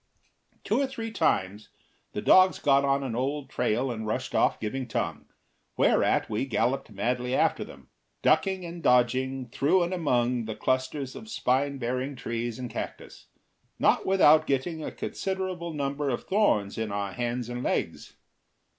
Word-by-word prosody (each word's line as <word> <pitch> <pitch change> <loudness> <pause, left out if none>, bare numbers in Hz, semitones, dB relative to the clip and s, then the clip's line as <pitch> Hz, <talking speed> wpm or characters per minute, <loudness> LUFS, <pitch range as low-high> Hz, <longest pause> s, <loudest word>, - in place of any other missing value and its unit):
Two - - +1
or 275 - +1
three 230 -4 -6
times 105 - 0 0.4
the - - -4
dogs 185 0 +6
got 140 -1 +3
on 140 0 +1
an 125 -4 -3
old 135 +2 -2
trail 125 +2 0
and 110 -2 -5
rushed 110 - -3
off - - +2
giving 125 +4 -3
tongue, - - -3 0.5
whereat - - +3
we 105 - -1
galloped 130 +2 0
madly 125 +5 -1
after - - +2
them, - - -13 0.4
ducking 190 -2 +2
and 170 0 -7
dodging 130 0 +2
through 155 +9 +2
and 175 +2 -2
among 125 -8 +1
the 110 -1 -5
clusters 130 +4 -1
of 220 +1 -10
spine 140 - 0
bearing 130 +3 -2
tress 120 -1 -4
and 125 -2 -6
cactus, - - -7 0.5
not - - +3
without 155 -5 +5
getting 155 +4 -1
a - - -4
considerable 185 -3 -4
number 140 -1 -2
of 120 - -2
thorns 110 - +1
in 110 -2 -2
our 100 -1 -2
hands 120 +1 -2
and 120 0 -5
legs. - - -2
130 Hz, 155 wpm, -27 LUFS, 120-155 Hz, 0.5 s, dogs